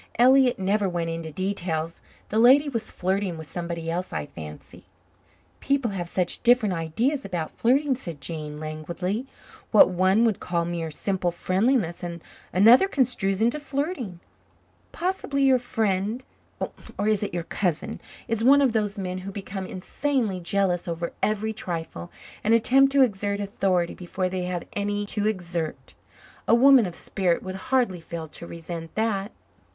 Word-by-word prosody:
Elliott 255 Hz, +1 st, +5 dB
never 195 Hz, +1 st, +1 dB
went 170 Hz, -2 st, -2 dB
into 165 Hz, -1 st, -5 dB
details. 170 Hz, -2 st, -2 dB, 0.3 s
The 215 Hz, -, +1 dB
lady 265 Hz, +5 st, +6 dB
was 230 Hz, -5 st, -3 dB
flirting 190 Hz, -1 st, -1 dB
with 160 Hz, -, -7 dB
somebody 170 Hz, 0 st, -5 dB
else, 180 Hz, +2 st, -3 dB
I 75 Hz, -, -3 dB
fancy." 75 Hz, 0 st, -11 dB, 0.7 s
"People 275 Hz, -5 st, 0 dB
have 175 Hz, -3 st, -4 dB
such 180 Hz, -1 st, -1 dB
different 240 Hz, -5 st, +4 dB
ideas 225 Hz, -, -1 dB
about 175 Hz, -5 st, -3 dB
flirting," 270 Hz, +4 st, +3 dB
said 170 Hz, -, -7 dB
Jane, 150 Hz, 0 st, -5 dB
languidly. 170 Hz, -, -4 dB, 0.4 s
"What 215 Hz, -, +7 dB
one 190 Hz, +5 st, +3 dB
would 220 Hz, -4 st, +1 dB
call 170 Hz, -1 st, -1 dB
mere 170 Hz, -1 st, -3 dB
simple 180 Hz, +3 st, -1 dB
friendliness 185 Hz, +2 st, 0 dB, 0.5 s
another 230 Hz, -, +7 dB
construes 240 Hz, -, +1 dB
into 240 Hz, +6 st, +2 dB
flirting. 280 Hz, -, -3 dB, 0.7 s
Possibly 335 Hz, -6 st, -1 dB
your 265 Hz, -2 st, +5 dB
friend 220 Hz, 0 st, -1 dB, 0.7 s
or 205 Hz, -, 0 dB
is 215 Hz, -2 st, +2 dB
it 205 Hz, -, -2 dB
your 175 Hz, -1 st, -3 dB
cousin? 175 Hz, -2 st, -2 dB, 0.3 s
is 225 Hz, -1 st, -1 dB
one 280 Hz, +3 st, +6 dB
of 260 Hz, -, +3 dB
those 210 Hz, -2 st, 0 dB
men 185 Hz, -1 st, -3 dB
who 190 Hz, +2 st, -7 dB
become 195 Hz, -1 st, -6 dB
insanely 215 Hz, +1 st, -1 dB
jealous 180 Hz, 0 st, 0 dB
over 170 Hz, 0 st, -3 dB
every 215 Hz, +1 st, 0 dB
trifle 165 Hz, -, -5 dB, 0.3 s
and 225 Hz, +2 st, +4 dB
attempt 270 Hz, +4 st, +4 dB
to 275 Hz, -1 st, +6 dB
exert 200 Hz, -3 st, -1 dB
authority 190 Hz, -3 st, 0 dB
before 185 Hz, +1 st, -3 dB
they 180 Hz, -1 st, -3 dB
have 180 Hz, -1 st, -3 dB
any 205 Hz, 0 st, -1 dB
to 205 Hz, 0 st, -1 dB
exert. 175 Hz, -6 st, -3 dB, 0.5 s
A -, -, +6 dB
woman 260 Hz, -3 st, +6 dB
of 175 Hz, -, -7 dB
spirit 180 Hz, -3 st, 0 dB
would 185 Hz, -, -5 dB, 0.2 s
hardly 240 Hz, -10 st, +2 dB
fail 165 Hz, -1 st, -6 dB
to 170 Hz, -, -9 dB
resent 165 Hz, -1 st, -7 dB
that." 215 Hz, -2 st, 0 dB
195 Hz, 155 wpm, -25 LUFS, 175-230 Hz, 0.7 s, What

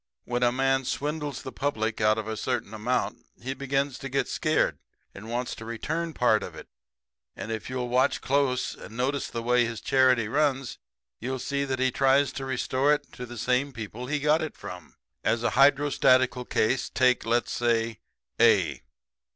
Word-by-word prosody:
"When 120 Hz, 0 st, -2 dB
a 120 Hz, -1 st, +4 dB
man 135 Hz, +1 st, +1 dB
swindles 145 Hz, 0 st, -3 dB
the 130 Hz, -, -6 dB
public 115 Hz, -7 st, -2 dB
out 110 Hz, 0 st, +4 dB
of 110 Hz, -1 st, -4 dB
a 110 Hz, -, -3 dB
certain 110 Hz, -, -3 dB
amount 115 Hz, +4 st, -1 dB, 0.2 s
he 130 Hz, +3 st, -4 dB
begins 135 Hz, 0 st, -1 dB
to 135 Hz, -, -6 dB
get 135 Hz, +2 st, 0 dB
scared 155 Hz, -1 st, +1 dB, 0.3 s
and 110 Hz, +3 st, -10 dB
wants 120 Hz, +1 st, -2 dB
to -, -, -9 dB
return 160 Hz, +9 st, -3 dB
part 110 Hz, -3 st, +3 dB
of -, -, -7 dB
it. -, -, -10 dB, 0.7 s
And 115 Hz, -, -6 dB
if 110 Hz, 0 st, -4 dB
you'll 125 Hz, -1 st, -2 dB
watch 125 Hz, +2 st, +2 dB
close 135 Hz, -2 st, 0 dB
and 110 Hz, -, -11 dB
notice 135 Hz, +2 st, 0 dB
the 115 Hz, -, -5 dB
way 125 Hz, +1 st, +3 dB
his 115 Hz, -1 st, -3 dB
charity 130 Hz, -2 st, +3 dB
runs 135 Hz, 0 st, 0 dB, 0.4 s
you'll 130 Hz, +3 st, -3 dB
see 140 Hz, +2 st, -2 dB
that 135 Hz, -1 st, -2 dB
he 130 Hz, 0 st, +2 dB
tries 135 Hz, +2 st, +3 dB
to 135 Hz, -, -5 dB
restore 130 Hz, +2 st, +1 dB
it 145 Hz, -1 st, -10 dB
to 125 Hz, -, -7 dB
the 120 Hz, 0 st, -9 dB
same 125 Hz, +4 st, +1 dB
people 115 Hz, +2 st, -7 dB
he 150 Hz, +2 st, 0 dB
got 150 Hz, +2 st, +2 dB
it 155 Hz, -, -5 dB
from. 90 Hz, -4 st, -9 dB, 0.3 s
As 115 Hz, 0 st, +1 dB
a -, -, +1 dB
hydrostatical 130 Hz, -3 st, +4 dB
case, 120 Hz, +3 st, 0 dB
take, 125 Hz, -1 st, +3 dB
let's 120 Hz, +2 st, 0 dB
say, 115 Hz, -2 st, 0 dB, 0.4 s
A. -, -, +4 dB
130 Hz, 185 wpm, -27 LUFS, 115-135 Hz, 0.7 s, a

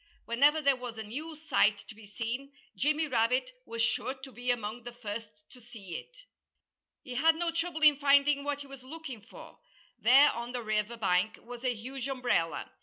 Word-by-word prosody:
Whenever 285 Hz, +7 st, +4 dB
there 280 Hz, -1 st, +5 dB
was 245 Hz, -2 st, -7 dB
a 220 Hz, -, -4 dB
new 300 Hz, +10 st, -6 dB
sight 255 Hz, -9 st, +2 dB
to -, -, -9 dB
be 215 Hz, -1 st, -14 dB
seen, 235 Hz, +6 st, -4 dB, 0.2 s
Jimmy 305 Hz, +3 st, +1 dB
Rabbit 250 Hz, -, +1 dB, 0.2 s
was 230 Hz, 0 st, -1 dB
sure 260 Hz, +3 st, 0 dB
to 265 Hz, 0 st, -11 dB
be 245 Hz, +2 st, -5 dB
among 235 Hz, -1 st, -1 dB
the 240 Hz, +1 st, -8 dB
first 225 Hz, -2 st, -6 dB, 0.2 s
to 250 Hz, -, -14 dB
see 220 Hz, -7 st, -10 dB
it. -, -, -17 dB, 0.8 s
He 250 Hz, -, -7 dB
had 320 Hz, +6 st, +4 dB
no 335 Hz, +1 st, -1 dB
trouble 330 Hz, -1 st, -2 dB
in 300 Hz, -2 st, +7 dB
finding 280 Hz, 0 st, +4 dB
what 290 Hz, 0 st, -2 dB
he -, -, -8 dB
was 275 Hz, -1 st, -10 dB
looking 275 Hz, -4 st, -8 dB
for. 225 Hz, -, -14 dB, 0.4 s
There 270 Hz, +6 st, +7 dB
on 235 Hz, +1 st, -6 dB
the 245 Hz, -1 st, -3 dB
river 215 Hz, +1 st, -1 dB
bank 200 Hz, +1 st, +1 dB
was 245 Hz, +1 st, -9 dB
a 250 Hz, -2 st, +1 dB
huge 255 Hz, +4 st, -6 dB
umbrella. 245 Hz, -11 st, -1 dB
250 Hz, 190 wpm, -30 LUFS, 230-285 Hz, 0.8 s, in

